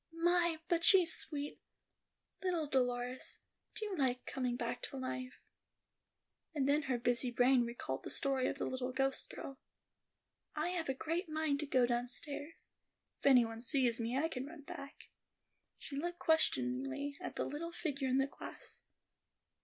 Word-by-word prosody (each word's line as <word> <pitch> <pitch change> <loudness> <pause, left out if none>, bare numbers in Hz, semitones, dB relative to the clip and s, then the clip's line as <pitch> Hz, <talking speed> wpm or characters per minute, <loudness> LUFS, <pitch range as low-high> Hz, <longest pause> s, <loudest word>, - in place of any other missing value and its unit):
"My, 345 -1 +4
but 340 -1 +1
she's 360 -4 +7
sweet; 290 -2 +1 0.8
Little 355 -4 0
Dolores, 250 -2 -1 0.4
do 435 - -3
you 410 -3 -3
like 255 -5 0
coming 250 -2 -1
back - - -3
to 275 - -7
life?" 255 -1 -5 1.1
And 275 -2 +1
then 290 +2 +4
her 260 -4 -1
busy 245 +1 +3
brain 245 +1 +4
recalled 185 - -4
the - - -5
story 270 -2 +2
of - - -2
the - - -2
little 260 0 -2
ghost 270 +1 0
girl. 270 -1 -8 1.0
"I - - 0
have 345 -5 -2
a 265 - 0
great 330 +5 -2
mind 310 -2 0
to 300 - -3
go 255 -3 +4
downstairs. 255 +6 -4 0.5
If - - 0
any 250 -3 +7
one 225 0 -6
sees 245 -2 +2
me, 235 +3 -1
I 310 +4 +2
can 265 -4 -5
run 305 -1 -10
back." 280 0 -9 0.7
She 280 - -8
looked 345 +5 -2
questioningly 135 - +1
at - - -5
the - - -1
little 335 +4 -4
figure 285 -6 -2
in 260 0 +2
the 270 - +4
glass. 275 - -8
270 Hz, 160 wpm, -35 LUFS, 250-315 Hz, 1.1 s, she's